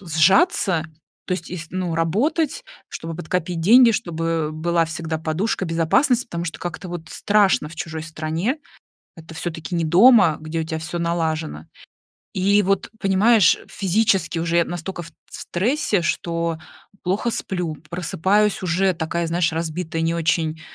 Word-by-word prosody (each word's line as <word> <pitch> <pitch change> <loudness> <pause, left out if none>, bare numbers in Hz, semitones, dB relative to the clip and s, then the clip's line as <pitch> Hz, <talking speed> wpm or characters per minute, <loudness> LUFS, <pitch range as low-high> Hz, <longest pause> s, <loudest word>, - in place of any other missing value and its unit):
сжаться, 175 - +3 0.4
то - - -2
есть 180 -2 -4
из 170 -2 -6
ну, 180 -2 -2
работать, 270 - 0 0.2
чтобы 165 0 -6
подкопить 175 0 -3
деньги, 230 +7 +7
чтобы 165 -6 -2
была 165 +2 +1
всегда 160 0 -4
подушка 170 +6 -1
безопасности, 185 - +2
потому 170 -6 -4
что 165 - -5
как-то, 175 +2 -6
вот, 170 -2 -7
страшно 205 -7 +2
в 170 - -13
чужой 160 -1 -5
стране, 165 - -2 0.6
это 165 -1 -12
всё-таки 165 +1 -5
не 165 -1 0
дома, 185 - +6
где 155 +1 -4
у - - -2
тебя 160 0 -4
всё 170 +2 -5
налажено. 160 - -2 0.7
И 200 +2 +3
вот, 195 0 0
понимаешь, 200 0 +4
физически 195 -3 +1
уже 170 +1 +1
я 170 - +4
настолько 175 +1 -5
ф 165 - -10
т - - -36 0.2
в - - -13
стрессе, 210 - 0
что 170 -1 -2 0.4
плохо 195 +6 0
сплю, 180 -7 -3
просыпаюсь 190 +5 +1
уже 185 +2 +2
такая, 170 +1 -2
знаешь, 165 0 0
разбитая, 165 0 -3
не 165 +1 +1
очень, 160 -1 0
170 Hz, 150 wpm, -22 LUFS, 160-195 Hz, 0.7 s, деньги